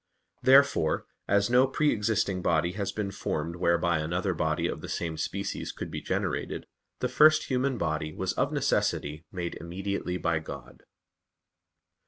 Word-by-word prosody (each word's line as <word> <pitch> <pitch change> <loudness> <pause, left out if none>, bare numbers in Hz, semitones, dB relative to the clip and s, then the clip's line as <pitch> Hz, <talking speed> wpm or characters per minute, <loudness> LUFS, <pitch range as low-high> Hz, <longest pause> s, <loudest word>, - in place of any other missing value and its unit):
Therefore 140 +2 +4 0.2
as 100 0 +3
no 125 +2 +6
pre 150 +3 +2
existing 105 -3 0
body 85 0 +2
has 100 +1 -3
been 100 -1 -3
formed 85 -2 -3
whereby 85 -1 +2
another 90 +5 -1
body 80 -1 0
of - - -3
the - - -7
same 80 -1 -2
species 100 +5 -3
could - - -7
be - - -4
generated, - - -2 0.4
the - - +2
first 155 +1 +5
human 130 0 +1
body 80 -4 -1
was 90 +3 -2
of - - 0
necessity 75 +3 0
made 90 -2 -4
immediately 90 +1 -3
by 85 -3 0
God. 65 -5 -10
90 Hz, 150 wpm, -28 LUFS, 80-105 Hz, 0.4 s, no